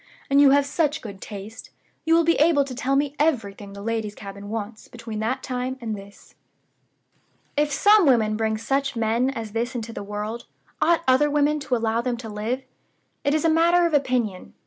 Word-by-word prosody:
And 280 Hz, +1 st, +6 dB
you 285 Hz, -, +7 dB
have 280 Hz, +1 st, +4 dB
such 305 Hz, -1 st, -1 dB
good 200 Hz, -4 st, -9 dB
taste, 210 Hz, +2 st, -9 dB, 0.4 s
you 325 Hz, 0 st, +4 dB
will 335 Hz, -, +4 dB
be 335 Hz, +1 st, +4 dB
able 300 Hz, -2 st, +4 dB
to 270 Hz, -2 st, -7 dB
tell 260 Hz, +2 st, -1 dB
me 285 Hz, 0 st, 0 dB
everything 210 Hz, -10 st, -1 dB
the 200 Hz, 0 st, -9 dB
ladies' 220 Hz, -2 st, -2 dB
cabin 200 Hz, 0 st, -9 dB
wants 215 Hz, 0 st, -6 dB
between 230 Hz, -2 st, -7 dB
that 255 Hz, +4 st, -2 dB
time 255 Hz, 0 st, -3 dB
and 225 Hz, -3 st, -4 dB
this.' 200 Hz, 0 st, -14 dB, 1.2 s
"If 295 Hz, 0 st, +1 dB
some 410 Hz, +3 st, +5 dB
women 220 Hz, -5 st, +3 dB
bring 220 Hz, 0 st, 0 dB
such 270 Hz, +4 st, -1 dB
men 230 Hz, +3 st, +1 dB
as 230 Hz, -5 st, -5 dB
this 235 Hz, +4 st, -2 dB
into 230 Hz, -1 st, -5 dB
the -, -, -6 dB
world, 210 Hz, +3 st, -5 dB, 0.3 s
ought 335 Hz, 0 st, +3 dB
other 260 Hz, +3 st, +4 dB
women 295 Hz, +1 st, +2 dB
to 270 Hz, -3 st, -1 dB
allow 225 Hz, 0 st, 0 dB
them 245 Hz, -1 st, -2 dB
to 230 Hz, -2 st, -8 dB
live? 220 Hz, +5 st, -3 dB, 0.6 s
It 285 Hz, +1 st, +2 dB
is 310 Hz, -, 0 dB
a -, -, +5 dB
matter 340 Hz, +2 st, +4 dB
of 335 Hz, -, 0 dB
opinion. 250 Hz, -9 st, -1 dB
245 Hz, 195 wpm, -24 LUFS, 220-285 Hz, 1.2 s, you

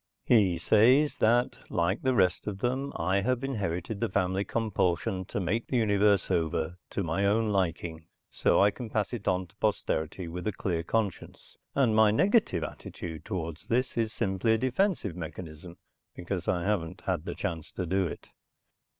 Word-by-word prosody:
He 100 Hz, -7 st, +4 dB
says 125 Hz, -, +4 dB
that, 120 Hz, +3 st, +2 dB
like 85 Hz, +5 st, 0 dB
the 130 Hz, -1 st, +1 dB
rest 95 Hz, -3 st, +2 dB
of 100 Hz, -2 st, -3 dB
them, 130 Hz, +5 st, -1 dB
I 95 Hz, +4 st, +1 dB
have 125 Hz, +4 st, 0 dB
inherited 100 Hz, -6 st, -3 dB
the 115 Hz, -, 0 dB
family 95 Hz, 0 st, 0 dB
compulsion 95 Hz, -4 st, -1 dB
to 100 Hz, -, -4 dB
make 100 Hz, +6 st, -1 dB
the 130 Hz, -, 0 dB
universe 100 Hz, -3 st, +3 dB
over 80 Hz, 0 st, -1 dB
to 100 Hz, -, -2 dB
my 85 Hz, +3 st, -1 dB
own 105 Hz, +2 st, +2 dB
liking 85 Hz, -4 st, -2 dB, 0.2 s
so -, -, +2 dB
I 100 Hz, -, +5 dB
can 120 Hz, 0 st, -7 dB
pass 105 Hz, +1 st, -1 dB
it 115 Hz, -4 st, -5 dB
on 90 Hz, 0 st, +1 dB
to 90 Hz, -, -24 dB
posterity 80 Hz, +3 st, -1 dB
with 90 Hz, +2 st, -5 dB
a 105 Hz, -, 0 dB
clear 85 Hz, -3 st, -2 dB
conscience, 100 Hz, +1 st, -3 dB, 0.2 s
and 125 Hz, -6 st, +3 dB
my 110 Hz, -1 st, +6 dB
negative 185 Hz, -, +2 dB
attitude 80 Hz, +1 st, -7 dB
toward 85 Hz, -6 st, -4 dB
this 125 Hz, +2 st, +1 dB
is 115 Hz, -2 st, 0 dB
simply 110 Hz, +1 st, +1 dB
a -, -, +3 dB
defense 130 Hz, -, +1 dB
mechanism 85 Hz, -1 st, -7 dB, 0.4 s
because 90 Hz, 0 st, -4 dB
I 85 Hz, -1 st, +1 dB
haven't 90 Hz, -3 st, -1 dB
had 85 Hz, -3 st, -2 dB
a -, -, -3 dB
chance 80 Hz, -3 st, -4 dB
to 90 Hz, -, -3 dB
do 95 Hz, +2 st, +1 dB
it. -, -, -9 dB
95 Hz, 175 wpm, -29 LUFS, 85-110 Hz, 0.4 s, my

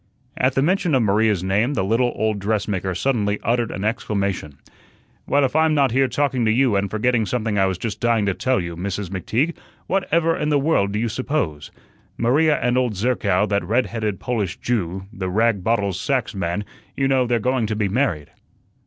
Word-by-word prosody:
At 130 Hz, 0 st, +1 dB
the 135 Hz, -, +2 dB
mention 175 Hz, -2 st, +2 dB
of 125 Hz, -, +3 dB
Maria's 105 Hz, -2 st, +2 dB
name 105 Hz, +9 st, +1 dB
the 95 Hz, -, 0 dB
little 115 Hz, +5 st, +1 dB
old 110 Hz, -1 st, 0 dB
dressmaker 100 Hz, -2 st, -1 dB
suddenly 105 Hz, -2 st, 0 dB
uttered 120 Hz, 0 st, +1 dB
an 95 Hz, -, -5 dB
exclamation. 100 Hz, -, -2 dB, 0.7 s
"Well, 140 Hz, 0 st, +3 dB
if 135 Hz, -, -3 dB
I'm 160 Hz, -1 st, +3 dB
not 140 Hz, -4 st, +3 dB
here 135 Hz, +2 st, +3 dB
talking 135 Hz, -3 st, 0 dB
to 110 Hz, -, +3 dB
you 125 Hz, -1 st, +3 dB
and 100 Hz, 0 st, 0 dB
forgetting 110 Hz, +1 st, +1 dB
something 110 Hz, -3 st, -1 dB
I 95 Hz, -, +4 dB
was 95 Hz, -2 st, -2 dB
just 110 Hz, +2 st, -4 dB
dying 115 Hz, -3 st, +2 dB
to 100 Hz, -, +1 dB
tell 130 Hz, +7 st, 0 dB
you. 85 Hz, -1 st, -4 dB
Mrs. 95 Hz, +2 st, -4 dB
McTeague, 115 Hz, -, -1 dB, 0.3 s
what 190 Hz, +2 st, -1 dB
ever 165 Hz, 0 st, +3 dB
in 150 Hz, -, -1 dB
the 150 Hz, -, +3 dB
world 135 Hz, -9 st, +1 dB
do -, -, -1 dB
you 115 Hz, +2 st, 0 dB
suppose? 110 Hz, -, -2 dB, 0.5 s
Maria 150 Hz, +6 st, +3 dB
and 125 Hz, +1 st, +1 dB
old 125 Hz, -4 st, 0 dB
Zerkow, 100 Hz, -3 st, +1 dB
that 100 Hz, -2 st, +1 dB
red 115 Hz, +8 st, +1 dB
headed 110 Hz, -4 st, -3 dB
Polish 105 Hz, -8 st, -2 dB
Jew, 95 Hz, -5 st, -2 dB
the 95 Hz, -2 st, -4 dB
rag 110 Hz, 0 st, +1 dB
bottles 100 Hz, -4 st, 0 dB
sacks 135 Hz, -5 st, -1 dB
man, 95 Hz, +1 st, -2 dB, 0.3 s
you 135 Hz, -, +2 dB
know, 130 Hz, -2 st, +2 dB
they're 120 Hz, 0 st, +2 dB
going 125 Hz, 0 st, 0 dB
to 110 Hz, -, -2 dB
be 105 Hz, -1 st, 0 dB
married." 95 Hz, -, -1 dB
110 Hz, 200 wpm, -21 LUFS, 100-130 Hz, 0.7 s, I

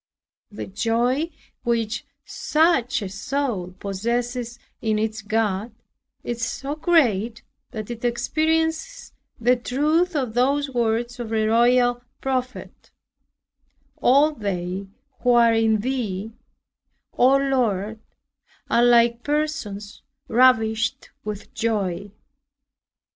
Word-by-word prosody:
The 205 Hz, -, -6 dB
joy 240 Hz, -, 0 dB, 0.3 s
which 235 Hz, +2 st, -1 dB, 0.2 s
such 300 Hz, -6 st, +1 dB
a -, -, -3 dB
soul 205 Hz, -4 st, -3 dB
possesses 235 Hz, +4 st, -2 dB, 0.2 s
in 215 Hz, -1 st, +1 dB
its 220 Hz, 0 st, -2 dB
God 215 Hz, 0 st, -1 dB, 0.5 s
is 235 Hz, -1 st, -3 dB
so 270 Hz, +5 st, -3 dB
great, 240 Hz, -, +2 dB, 0.3 s
that 220 Hz, -1 st, -6 dB
it 235 Hz, 0 st, -7 dB
experiences 320 Hz, -, -1 dB, 0.3 s
the 245 Hz, +2 st, +4 dB
truth 305 Hz, +8 st, +1 dB
of 255 Hz, -6 st, -1 dB
those 275 Hz, +3 st, +1 dB
words 235 Hz, 0 st, -1 dB
of 235 Hz, -2 st, -4 dB
the 220 Hz, -1 st, +1 dB
royal 245 Hz, +2 st, +3 dB, 0.2 s
prophet, 255 Hz, -1 st, -4 dB, 1.1 s
"All 285 Hz, +4 st, +4 dB
they 195 Hz, -6 st, -4 dB, 0.3 s
who 245 Hz, -1 st, +3 dB
are 235 Hz, -1 st, +5 dB
in 220 Hz, -1 st, +2 dB
thee, 220 Hz, -4 st, -3 dB, 0.8 s
O 265 Hz, +2 st, +5 dB
Lord, 225 Hz, -6 st, 0 dB, 0.7 s
are 235 Hz, -, +4 dB
like 235 Hz, -1 st, +4 dB
persons 290 Hz, -9 st, -3 dB, 0.3 s
ravished 220 Hz, -3 st, +2 dB
with 210 Hz, -1 st, -7 dB
joy." 205 Hz, -4 st, -1 dB
235 Hz, 100 wpm, -23 LUFS, 220-265 Hz, 1.1 s, are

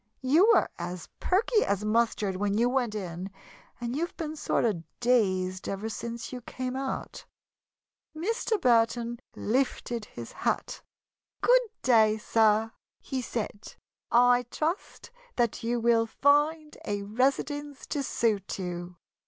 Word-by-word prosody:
You 320 Hz, -, +5 dB
were -, -, +4 dB
as 175 Hz, 0 st, -5 dB
perky 425 Hz, +4 st, +2 dB
as 200 Hz, +1 st, -1 dB
mustard 215 Hz, -3 st, +1 dB
when 200 Hz, +2 st, 0 dB
you 235 Hz, +2 st, +3 dB
went 245 Hz, -4 st, 0 dB
in 185 Hz, -2 st, -5 dB, 0.5 s
and 240 Hz, +1 st, -3 dB
you've 335 Hz, +4 st, -3 dB
been 310 Hz, -1 st, -4 dB
sort 295 Hz, -, 0 dB
of 205 Hz, -8 st, 0 dB, 0.2 s
dazed 185 Hz, -7 st, +1 dB
ever 200 Hz, +3 st, -3 dB
Since 235 Hz, +2 st, -6 dB
you 250 Hz, -, -5 dB
came 255 Hz, +2 st, -5 dB
out." 270 Hz, 0 st, -4 dB, 0.9 s
Mr. 440 Hz, +4 st, 0 dB
Burton 235 Hz, -2 st, +2 dB, 0.2 s
lifted 240 Hz, -1 st, -1 dB
his 120 Hz, -, -9 dB
hat. -, -, -2 dB, 0.6 s
"Good -, -, +6 dB, 0.2 s
day, 220 Hz, -3 st, +5 dB
sir!" 220 Hz, 0 st, +3 dB, 0.3 s
he 265 Hz, -1 st, -4 dB
said. 220 Hz, -3 st, -5 dB, 0.3 s
"I 245 Hz, 0 st, +4 dB
trust 330 Hz, -, -3 dB, 0.2 s
that 235 Hz, -2 st, 0 dB
you 240 Hz, +1 st, 0 dB
will 230 Hz, -1 st, +3 dB
find 295 Hz, +5 st, +2 dB
a 205 Hz, -1 st, -2 dB
residence 275 Hz, +6 st, -1 dB
to 290 Hz, -, -1 dB
suit 220 Hz, -7 st, 0 dB
you." 175 Hz, -1 st, -5 dB
235 Hz, 130 wpm, -28 LUFS, 210-270 Hz, 0.9 s, Good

